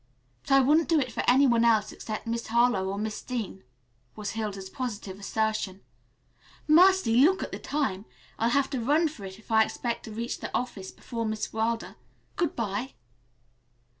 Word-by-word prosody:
"But - - -9
I 275 - +7
wouldn't 305 +6 +3
do 325 -2 +4
it 255 -3 -2
for - - -2
any 265 +3 +6
one 235 -3 +3
else 220 -3 +3
except 215 +1 -6
Miss 230 0 -3
Harlowe 235 -5 +2
or 200 - -3
Miss 215 +1 -3
Dean," 230 -6 -5 0.5
was 210 -2 -4
Hilda's 205 -3 -4
positive 205 -4 -5
assertion. 210 -2 -2 0.9
"Mercy, 335 -7 +5
look 335 +9 +5
at - - -6
the - - -5
time! 220 -10 -2 0.3
I'll 230 - +2
have 275 +2 +1
to 265 - -1
run 305 +7 +3
for 225 -10 -10
it 190 0 -8
if 220 +2 -15
I 220 0 +6
expect 235 +1 -4
to 220 - -8
reach 230 +3 -4
the - - -5
office 200 -6 -5
before 230 -2 -5
Miss 215 0 -3
Wilder. 225 +1 -2 0.4
Good 340 -4 -1
bye." 225 +3 -3
230 Hz, 180 wpm, -27 LUFS, 210-260 Hz, 0.9 s, I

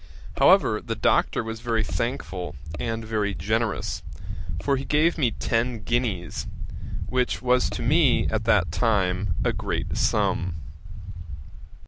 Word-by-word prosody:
However, - - +5
the - - -3
Doctor - - +2
was 110 0 -5
very 115 -1 0
thankful, 90 - -3 0.2
and 115 -1 -3
very 105 -3 -1
generous, 110 +1 -1 0.6
for 140 +7 +1
he 135 - -3
gave 155 +5 +3
me 135 -7 +2
ten 115 0 -1
guineas, 105 -9 -1 0.6
which 125 -1 0
was 125 0 +3
to - - -4
me 155 -3 +4
at 110 0 -1
that 95 -8 +3
time 95 -4 +1
a - - +2
great - - -3
sum.' 90 -2 +1
115 Hz, 125 wpm, -25 LUFS, 100-125 Hz, 0.6 s, However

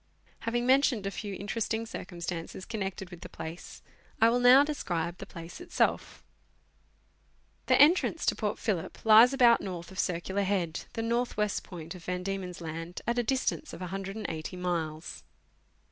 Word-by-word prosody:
Having 240 +1 -1
mentioned 260 -5 +3
a 195 - -1
few 200 -1 -5
interesting 220 +3 -2
cir 225 - -6
cumstances 170 0 -6
connected 195 -4 -4
with 175 -1 -10
the - - -8
place, 160 +2 -8 0.4
I 225 - +6
will 245 - +2
now 250 +3 +8
describe 175 - -3
the - - -8
place 170 - -9
itself. 350 0 -1 1.4
The - - +4
entrance 320 +6 +5
to - - +2
Port - - -2
Phillip - - -3
lies 225 +3 +8
about 245 -3 +5
north 180 -2 -6
of 190 - -8
Circular 185 +2 -1
Head, 185 -5 -1
the 225 -2 -2
north 235 +1 -1
west 210 -1 0
point 165 -3 -8
of 180 -2 -11
Van 180 0 -2
Diemen's 185 -2 -4
Land, 165 +2 -6
at 240 +1 +1
a - - +2
distance 265 +5 -1
of - - -8
180 190 -2 -5
miles. 165 -3 -3
195 Hz, 160 wpm, -29 LUFS, 175-235 Hz, 1.4 s, now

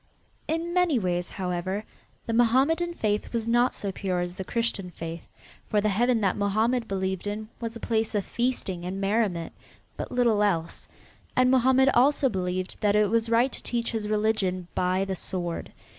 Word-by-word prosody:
In 330 +2 -2
many 360 -6 +3
ways, 180 -4 -1
however, 185 +2 -3 0.4
the 230 - -2
Mohammedan 275 +9 +3
faith 210 -5 -1
was 230 -1 -2
not 240 +2 +3
so 200 - -4
pure 185 -2 -2
as 175 0 -4
the 190 - -4
Christian 230 -3 -1
faith, 165 -1 -7 0.4
for 210 - +3
the 210 +1 +1
Heaven 235 +3 +2
that 195 -3 +2
Mohammed 220 +4 +1
believed 190 0 -2
in 215 +1 -4
was 230 -1 -4
a - - -6
place 225 -1 -1
of 205 - 0
feasting 235 -8 -2
and 185 +2 -4
merriment, 195 -4 0 0.4
but - - -5
little 235 -4 +3
else, 170 -6 0 0.5
and 255 0 +4
Mohammed 260 +1 +5
also 275 +2 +4
believed 185 -2 -3
that 205 -1 +3
it 210 -1 +3
was 230 0 +1
right 235 +3 +3
to - - -8
teach 235 -1 -2
his 215 -2 -3
religion 210 -4 0
by 185 +1 +1
the 190 -1 -3
sword. 175 -2 -4
215 Hz, 175 wpm, -27 LUFS, 190-240 Hz, 0.5 s, Mohammed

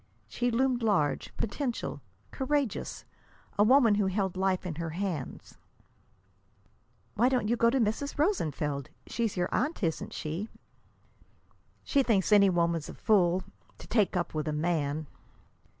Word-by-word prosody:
She 245 0 -1
loomed 250 +1 +1
large, 175 -11 +1
potential, 240 +3 -3 0.3
courageous, 270 -5 -2 0.5
a - - +7
woman 240 -1 +5
who 205 -1 +2
held 190 -1 -1
life 190 0 0
in 165 -4 -4
her 165 - -3
hands. 170 -5 -5 1.5
"Why 240 +4 +3
don't 250 -5 +1
you 235 - +2
go 230 0 +4
to 265 +3 +1
Mrs. 230 +6 -1
Rosenfeld? 150 - -1 0.2
She's 230 -5 -2
your 175 0 0
aunt, 290 -3 -1
isn't 160 -2 -2
she?" 165 +8 -4 1.3
"She 280 - +2
thinks 215 -6 +1
any 200 -2 +7
woman's 170 -3 0
a - - -8
fool 185 -3 +2 0.3
to - - -11
take 210 -5 +1
up 175 - -2
with 155 0 -2
a 155 - -1
man." 155 -1 -1
200 Hz, 140 wpm, -29 LUFS, 170-240 Hz, 1.5 s, a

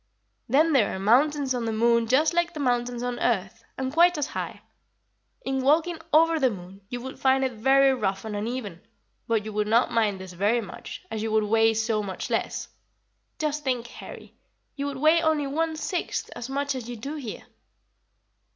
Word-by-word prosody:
"Then 305 +6 +4
there 230 -9 +3
are - - -5
mountains 270 +6 +3
on 245 -2 -2
the 225 - -1
moon 235 +1 +2
just 295 +7 +3
like 345 0 0
the - - -5
mountains 245 -2 0
on 245 0 -3
earth, 200 -4 -1
and 260 0 -3
quite 345 +1 +5
as 295 - 0
high. - - -6 0.8
In 265 0 -1
walking 320 +5 +2
over 325 +1 +4
the 265 -3 +3
moon 190 -2 -9
you 245 - -4
would 265 +2 -8
find 265 0 +3
it 260 - 0
very 270 +4 +4
rough 195 -5 -2
and 215 -1 -4
uneven, 210 -4 -4 0.5
but 225 -2 0
you 215 - -6
would 210 0 0
not 230 +3 +3
mind 210 -4 +1
this 185 -1 -9
very 205 +7 +2
much, 235 - -8
as 220 - -3
you 220 0 -2
would 220 0 +3
weigh 225 +1 +3
so 220 -1 0
much 195 -2 -5
less. - - -1 0.7
Just 300 -1 -2
think, 250 -3 -1
Harry, 240 - -11 0.4
you 280 0 -3
would 280 -2 -4
weigh 310 +4 +4
only 315 -3 +1
one 320 +3 -1
sixth 340 +3 -3
as 240 - -6
much 280 +1 -1
as 245 -3 -6
you 245 - -5
do 275 +7 -6
here." 245 -7 -7
250 Hz, 195 wpm, -26 LUFS, 220-285 Hz, 0.8 s, quite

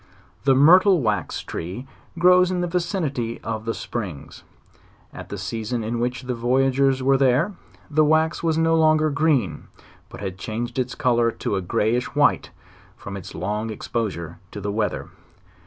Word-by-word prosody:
The 135 -1 +5
myrtle 180 +7 +6
wax 105 - -1
tree 95 +10 -6 0.3
grows 180 +1 +5
in 180 -1 -1
the 175 - -1
vicinity 165 - -2
of 110 -1 -4
the 115 - -1
springs. 95 - -6 0.7
At - - -9
the - - -5
season 115 +1 -3
in 115 +2 -2
which 125 +2 -2
the 125 0 -3
voyagers 130 +2 +2
were 135 +1 +4
.there, 135 +9 +2 0.3
the 155 0 +3
wax 155 +2 +2
was 160 -1 +1
no 165 0 +3
longer 155 -1 +3
green, 140 - 0 0.4
but - - -10
had 95 -2 -5
changed 120 +7 -4
its 125 0 -2
color 120 -2 +2
to 110 - -3
a 95 - -1
greyish 110 +8 -1
white, 145 0 +3 0.5
from 100 - -8
its 95 0 -8
long 105 +5 -3
exposure 100 -7 -4
to 105 - -8
the 100 0 -3
weather. 105 0 -2
125 Hz, 160 wpm, -23 LUFS, 110-155 Hz, 0.7 s, myrtle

